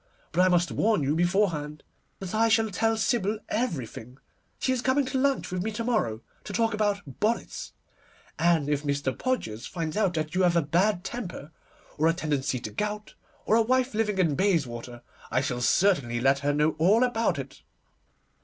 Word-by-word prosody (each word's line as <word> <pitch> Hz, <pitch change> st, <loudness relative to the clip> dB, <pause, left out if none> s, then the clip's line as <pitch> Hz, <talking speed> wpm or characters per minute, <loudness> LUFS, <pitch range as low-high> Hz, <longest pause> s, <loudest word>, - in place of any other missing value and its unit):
But 175 Hz, -, +2 dB
I 185 Hz, -, +5 dB
must 175 Hz, -1 st, +2 dB
warn 215 Hz, -8 st, +1 dB
you 140 Hz, +2 st, +1 dB
beforehand 170 Hz, -4 st, 0 dB, 0.3 s
that 190 Hz, -2 st, -7 dB
I 225 Hz, +1 st, +3 dB
shall 220 Hz, -1 st, +2 dB
tell 225 Hz, +4 st, +1 dB
Sybil 220 Hz, -2 st, 0 dB
everything. 130 Hz, -, -3 dB, 0.4 s
She 260 Hz, -, 0 dB
is 250 Hz, -, -1 dB
coming 265 Hz, +2 st, +2 dB
to 260 Hz, +1 st, -1 dB
lunch 275 Hz, -6 st, 0 dB
with 180 Hz, -1 st, -2 dB
me 215 Hz, -, -2 dB
to 230 Hz, -, -3 dB
morrow, 210 Hz, -, 0 dB, 0.2 s
to -, -, -7 dB
talk 225 Hz, +2 st, +1 dB
about 205 Hz, -9 st, -2 dB
bonnets, 225 Hz, +3 st, -2 dB, 0.7 s
and 165 Hz, -3 st, +3 dB
if 145 Hz, -1 st, 0 dB
Mr. 140 Hz, -2 st, -1 dB
Podgers 115 Hz, -, -3 dB
finds 165 Hz, -3 st, -4 dB
out 200 Hz, -5 st, +1 dB
that 155 Hz, 0 st, -2 dB
you 185 Hz, -, +1 dB
have 175 Hz, -2 st, +3 dB
a 170 Hz, -, +3 dB
bad 175 Hz, +5 st, +1 dB
temper, 180 Hz, -, -6 dB, 0.5 s
or 155 Hz, -, +4 dB
a 165 Hz, -, +4 dB
tendency 145 Hz, -6 st, -1 dB
to -, -, -6 dB
gout, 210 Hz, 0 st, -4 dB, 0.3 s
or 220 Hz, -, +3 dB
a 230 Hz, -, +5 dB
wife 255 Hz, +2 st, +1 dB
living 210 Hz, -2 st, 0 dB
in 170 Hz, -5 st, +2 dB
Bayswater, 125 Hz, -10 st, -1 dB, 0.3 s
I 130 Hz, -, +1 dB
shall 125 Hz, -3 st, -2 dB
certainly 135 Hz, -7 st, +2 dB
let 135 Hz, +2 st, +3 dB
her 145 Hz, +1 st, 0 dB
know 150 Hz, +2 st, +2 dB
all 205 Hz, +9 st, +4 dB
about 230 Hz, -2 st, +1 dB
it. -, -, -8 dB
180 Hz, 185 wpm, -27 LUFS, 145-220 Hz, 0.7 s, I